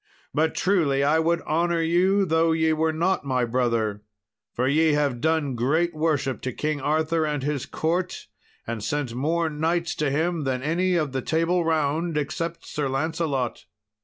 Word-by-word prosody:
But 160 +1 +1
truly 155 -8 +2
I 150 +3 +3
would 170 +1 +1
honour 170 +2 +1
you 185 +4 +3
though 165 -1 +2
ye 160 0 +2
were 160 +1 +1
not 170 +4 0
my 130 -3 0
brother, 115 -4 0 0.5
for 125 +2 -1
ye 155 +2 +3
have 140 -5 0
done 160 -3 +1
great 155 +9 +1
worship 150 -4 -1
to 130 - -3
King 150 +3 -2
Arthur 160 +3 +1
and 150 -3 -2
his 145 -2 -2
court, 175 +3 -2 0.4
and 115 -2 -4
sent 145 -3 -2
more 160 +6 0
knights 165 +3 -1
to 150 -2 +1
him 160 +3 0
than 130 -1 -2
any 180 +4 +1
of 155 -5 0
the 130 0 -2
Table 165 +5 +1
Round, 160 +1 0
except 165 +3 -3
Sir 145 -2 -2
Lancelot." 135 -2 -2
155 Hz, 165 wpm, -25 LUFS, 140-165 Hz, 0.5 s, I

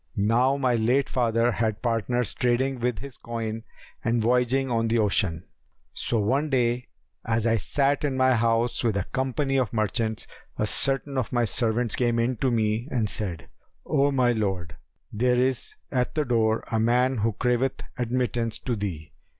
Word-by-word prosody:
Now 120 +7 +2
my 130 -3 +1
late 120 +4 +2
father 115 -1 +1
had 110 -1 -2
partners 120 0 0
trading 125 +1 0
with 125 -1 -1
his 140 -2 -9
coin 115 -1 -4 0.4
and 120 0 +1
voyaging 125 +3 +1
on 115 -1 +1
the 115 +1 +1
ocean. 95 -6 +1 0.5
So 115 - -1
one 135 +9 +1
day, 125 -2 0 0.4
as 115 0 0
I 115 -1 +3
sat 140 +7 0
in 140 -3 -1
my 130 0 +4
house 115 +1 +1
with 110 -4 +1
a 100 - 0
company 135 +3 -1
of 125 -6 -1
merchants, 110 0 -1 0.3
a 105 - +1
certain 135 +4 +2
of 125 - -3
my 120 -1 +2
servants 115 0 +1
came 120 -2 +1
in 120 +1 0
to 130 - +1
me 110 +1 0
and 115 -7 -1
said, 90 -7 -4 0.4
'O 145 -2 +2
my 130 -3 +3
lord, 95 -8 -2 0.4
there 125 +3 +2
is 130 0 0 0.2
at 125 -1 -1
the 150 -1 +1
door 110 -2 +1
a 110 - +1
man 125 +3 +2
who 110 +1 0
craveth 125 +3 0
admittance 120 -2 -1
to 125 - -3
thee!' 95 -7 -5
120 Hz, 170 wpm, -25 LUFS, 110-130 Hz, 0.5 s, my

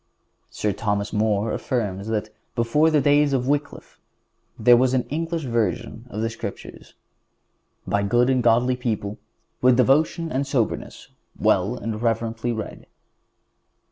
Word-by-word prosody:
Sir 105 - -2
Thomas 105 0 -2
More 105 0 +1
affirms 105 -5 -2
that, 110 -1 -2 0.3
before 120 +7 +3
the 155 -2 +3
days 145 0 +3
of 130 -1 0
Wycliffe, 145 0 -3 0.6
there 120 +2 +6
was 130 +1 +3
an 125 - +1
English 165 +2 -2
version 115 0 -2
of 110 - -4
the 115 - 0
Scriptures, 115 - -8 0.9
"by 100 - 0
good 120 +5 +2
and 130 -1 +2
godly 120 +2 +3
people 110 -4 -3 0.4
with 125 -1 +5
devotion 155 +5 +2
and 135 +2 -1
soberness 130 -5 -2 0.3
well 100 +7 +1
and 110 -2 -4
reverently 115 0 -1
read." 110 -2 -6
120 Hz, 135 wpm, -23 LUFS, 110-130 Hz, 0.9 s, there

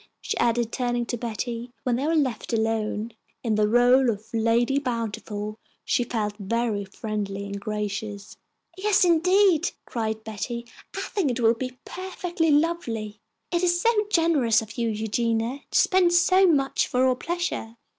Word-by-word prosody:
she - - -3
added, 235 -1 +1
turning 240 -1 -1
to 240 - -3
Betty, 235 +1 -4
when 250 -3 +1
they 270 +5 -1
were 330 - +2
left 260 -7 -1
alone. 220 0 -1 0.3
In 230 -3 0
the 210 0 +3
rôle 245 +2 +5
of 215 +1 -9
Lady 230 +4 +2
Bountiful 220 -4 -4 0.3
she 245 - +2
felt 215 -3 -2
very 215 0 -1
friendly 200 0 -4
and 200 0 -5
gracious. 210 -1 -4 0.4
"Yes, 390 0 +3
indeed!" 355 0 +4
cried 220 -2 -3
Betty. 235 +2 -5 0.3
"I - - -1
think 375 -9 -1
it 250 0 -2
will 230 -1 +4
be 255 +2 -6
perfectly 360 -3 -2
lovely. 285 -10 0 0.3
It 345 -1 +1
is 350 -1 +2
so 465 +6 +3 0.2
generous 295 - +3
of 220 -1 -8
you, 235 -2 0
Eugenia, 225 +3 -1
to - - +3
spend 365 -2 +4
so 370 +2 +5
much 275 -5 +2
for 255 0 +2
our 255 -1 +3
pleasure!" 335 -7 -3
235 Hz, 155 wpm, -25 LUFS, 220-310 Hz, 0.4 s, rôle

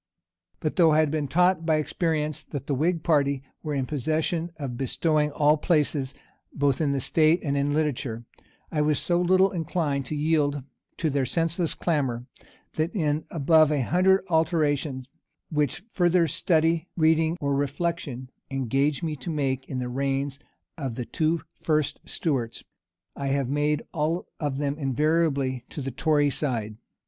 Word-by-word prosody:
But - - -3
though 170 -3 +6
I 155 - +4
had 155 -2 +2
been 155 -2 -1
taught 180 +3 +3
by 160 -1 +2
experience 155 -1 -1
that 140 -3 -6
the 140 - -1
whig 160 +4 0
party 140 -4 +2 0.2
were 150 -2 -3
in 135 -2 0
possession 160 +4 -1
of 135 -5 -4
bestowing 150 +4 +1
all 150 +1 +3
places, 150 -4 0 0.4
both 140 0 +1
in 145 -3 +2
the 140 - 0
state 160 +5 +3
and 140 -3 -1
in 140 +1 +1
Literature, 135 -6 -1 0.5
I 150 - +1
was 150 -1 +2
so 175 0 +1
little 185 +2 +4
inclined 160 -6 -1
to 155 - -3
yield 145 -2 +1 0.3
to 160 -3 0
their 135 -2 0
senseless 165 +2 0
clamor, 135 -8 -1 0.5
that 160 +6 -1
in 155 -4 0
above 155 0 +4
a 145 -3 +1
hundred 190 +6 +3
alterations, 150 -5 +1 0.4
which 150 +2 0
further 175 -1 +3
study, 165 +2 +1
reading, 160 +1 +3
or 140 -1 0
reflection 140 -2 -2 0.2
engaged 135 +3 0
me 155 -2 -1
to 135 - -7
make 135 -4 -1
in 130 - -3
the 125 -1 -2
reigns 135 +2 -1 0.4
of 130 -6 -3
the 125 - -4
two 155 +7 0 0.2
first 155 -3 0
Stuarts, 130 -8 -2 0.5
I 140 - -3
have 135 -2 0
made 145 +1 +1
all 160 +3 -1
of 145 -3 -2
them 145 +1 -2
invariably 140 -2 +1
to - - -7
the 135 -1 -3
tory 145 +1 +2
side. 115 -8 -3
150 Hz, 160 wpm, -26 LUFS, 135-160 Hz, 0.5 s, though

